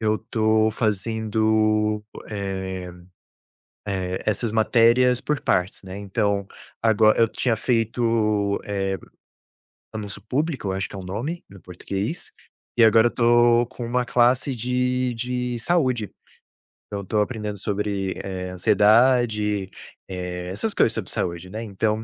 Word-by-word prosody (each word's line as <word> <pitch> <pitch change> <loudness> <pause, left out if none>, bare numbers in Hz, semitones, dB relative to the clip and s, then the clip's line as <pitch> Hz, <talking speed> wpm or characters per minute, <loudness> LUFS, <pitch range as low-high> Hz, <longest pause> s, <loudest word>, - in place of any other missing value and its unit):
Eu 110 -1 +1
estou 110 0 +1
fazendo, 110 0 +1 0.3
eh, 95 -3 -4 1.0
eh, 95 -2 -3
essas 110 +1 0
matérias 120 +3 +4
por 150 -1 -1
partes, 90 +2 0
né, 95 0 -8
então, 100 0 -1 0.4
agora 110 -1 +4
eu 115 - +5
tinha 115 -1 0
feito, 115 -3 +1
eh, 95 -1 -2 1.0
anúncio 105 -2 -6
público, 130 - -2
acho 95 +1 -2
que - - -10
é - - -6
o 95 - -8
nome 120 - -4
no 100 -1 -13
português. 95 - -5 0.5
E 120 - +6
agora 110 +1 +6
eu - - 0
estou 120 0 +4
com 120 - -7
uma 125 +1 0
classe 125 +3 +2
de 125 +1 0
de 125 +1 -3
saúde. 130 - 0 0.8
Então 100 - -3
eu - - -6
estou 105 +2 0
aprendendo 105 -2 -3
sobre, 100 -1 -2
eh, 95 -1 -5
ansiedade, 105 +1 +3 0.4
eh, 90 -1 -5
essas 200 - -1
coisas - - +3
sobre 110 -5 -4
saúde, 85 0 -3
né. 110 +4 -6
Então, 110 +1 -1
110 Hz, 135 wpm, -23 LUFS, 100-120 Hz, 1.0 s, E